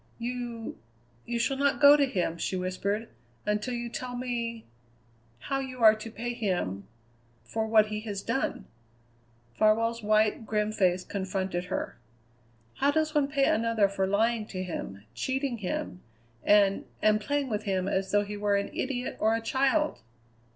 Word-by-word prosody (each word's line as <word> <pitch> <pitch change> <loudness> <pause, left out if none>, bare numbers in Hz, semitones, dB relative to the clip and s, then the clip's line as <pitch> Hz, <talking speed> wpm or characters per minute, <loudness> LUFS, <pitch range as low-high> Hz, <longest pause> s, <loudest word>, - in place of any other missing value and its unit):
"You 240 -1 -5 0.5
you 240 - -1
shall 265 +4 0
not 280 0 +2
go 285 0 +9
to 285 -2 +3
him," 175 -7 -1
she 185 - -1
whispered, 195 +4 -2 0.4
"until 210 +4 -1
you 240 0 -3
tell 245 +1 -5
me 235 -2 -3 0.8
how 275 - -1
you 255 -3 -5
are 215 -1 +9
to 215 +1 -7
pay 240 +2 -4
him 180 - -2 0.6
for 220 - -2
what 215 -1 +5
he 210 0 -3
has 205 -3 -5
done!" 250 +4 -1 0.9
Farwell's 230 - +2
white, 215 +1 +2
grim 210 0 0
face 185 -3 +2
confronted 190 -2 -3
her. - - -4 0.8
"How 275 - +3
does 310 +1 +1
one 295 -3 +3
pay 275 -1 +2
another 225 -2 +3
for 195 -1 -1
lying 220 +2 +1
to 185 -3 -4
him, 100 - -6
cheating 260 - -2
him, 180 -1 -4 0.4
and 200 -1 +4 0.2
and 215 0 +4
playing 285 +4 -1
with 210 0 -2
him 190 -2 0
as 190 -1 0
though 205 +1 +3
he 210 +1 -5
were 205 0 +1
an 200 0 -1
idiot 255 -1 -3
or 220 +1 +3
a - - 0
child?" 275 +6 +1
220 Hz, 160 wpm, -28 LUFS, 200-245 Hz, 0.9 s, go